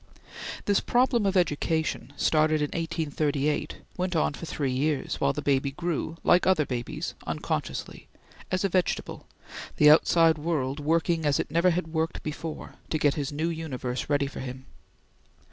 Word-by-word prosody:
This 200 -1 +3
problem 240 -3 +2
of 195 0 +2
education, 160 -4 0
started 155 0 +3
in 150 -1 0
1838, 150 -3 -1 0.2
went 180 -1 -1
on 155 - +2
for 165 - -7
three 140 -3 -2
years, 140 +3 -1
while 140 - +3
the 145 +2 -5
baby 140 -1 +2
grew, 165 +2 -3
like 180 - +4
other 185 -6 +4
babies, 120 -3 -4
unconsciously, - - -4 0.4
as 185 +1 0
a 195 - +2
vegetable, 185 0 -1 0.5
the 150 0 +8
outside 165 0 +5
world 150 -3 -1
working 165 +2 +1
as 145 -2 +2
it - - -3
never 170 +2 +4
had 175 -1 -1
worked 160 0 -1
before, 155 +1 -6 0.2
to 155 - 0
get 145 -2 +3
his 145 -1 -3
new 155 +3 -1
universe 135 -7 -4
ready 145 -1 +2
for 135 - -7
him. 130 0 -7
155 Hz, 160 wpm, -27 LUFS, 145-170 Hz, 0.5 s, the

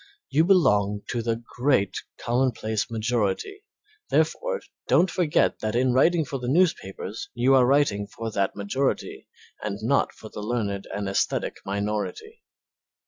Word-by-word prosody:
You 160 +2 +4
belong 105 - +3
to 120 - -1
the 115 0 0 0.2
great 125 -7 +2 0.2
commonplace 120 -3 0
majority, 115 - -1 0.5
therefore - - +1 0.3
don't 185 - +4
forget 170 -5 +1
that 110 +1 -2
in 125 +1 +2
writing 160 +5 +4
for 135 -1 -4
the 125 - -5
newspapers 125 - 0
you 125 +3 +3
are 130 -2 +6
writing 130 -8 +2
for 115 +2 -6
that 100 -2 0
majority 115 +7 -2 0.3
and 100 -1 -3
not 140 +5 +2
for 110 - -12
the 105 - -7
learned 105 -3 -2
and 100 -1 -3
aesthetic 100 - -1
minority. 105 - -3
120 Hz, 140 wpm, -25 LUFS, 105-140 Hz, 0.5 s, are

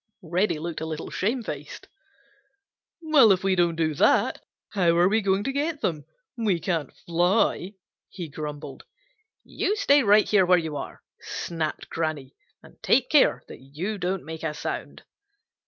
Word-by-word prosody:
Reddy 175 +2 0
looked 165 0 -5
a 160 - -3
little 160 0 -6
shamefaced. 205 - -4 1.2
"Well, 290 -9 +6
if 190 -1 +2
we 195 -1 +2
don't 175 -2 +2
do 160 -1 0
that, - - +2 0.3
how 175 -4 +2
are 175 +1 +5
we 220 +3 +2
going 195 0 +1
to 270 - -2
get 295 +3 -2
them? 155 -4 -2 0.3
We 215 -7 0
can't 165 -5 -2
fly," 180 +3 +1 0.3
he 175 -4 -7
grumbled. 150 0 -7 0.6
"You 415 0 -1
stay 290 -8 +4
right 210 -2 +4
here 205 -3 +4
where 180 0 +6
you 160 -3 -3
are," - - -7 0.2
snapped 165 -2 -4
Granny, 155 -5 -3 0.3
"and - - -18
take - - +2
care - - +4
that - - -11
you 165 +11 -5
don't 185 +1 -2
make 160 0 -7
a 155 -2 -3
sound." - - -5
175 Hz, 155 wpm, -25 LUFS, 160-210 Hz, 1.2 s, Well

